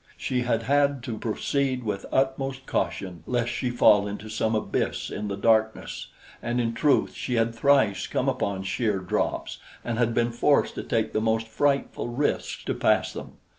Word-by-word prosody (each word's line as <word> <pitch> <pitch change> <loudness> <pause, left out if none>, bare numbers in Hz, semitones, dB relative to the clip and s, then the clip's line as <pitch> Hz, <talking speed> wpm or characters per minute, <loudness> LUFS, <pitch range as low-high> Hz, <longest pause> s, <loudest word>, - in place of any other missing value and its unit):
She 125 -1 -1
had 115 -2 0
had 140 0 +2
to 115 -4 -5
proceed 130 +3 -1
with 105 -3 -3
utmost 135 0 0
caution 90 - -2
lest 120 -1 0
she 125 +1 -2
fall 105 -4 +5
into 105 +1 -6
some 110 +1 0
abyss 110 - -2
in 105 - -4
the 100 -1 -3
darkness 110 +1 +1 0.3
and 120 +1 -1
in 115 -1 0
truth 140 +5 +2
she 125 - -3
had 115 0 +1
thrice 115 -5 +3
come - - -1
upon 95 -1 -1
sheer 105 +2 0
drops 90 -2 -2 0.3
and 115 -1 -2
had 115 -1 +1
been 120 0 +2
forced 140 +5 +2
to - - -5
take 110 -1 -1
the 110 - +1
most 115 0 0
frightful 140 +4 0
risks 140 +5 -1
to - - -1
pass - - +2
them. - - -8
115 Hz, 175 wpm, -26 LUFS, 110-130 Hz, 0.3 s, fall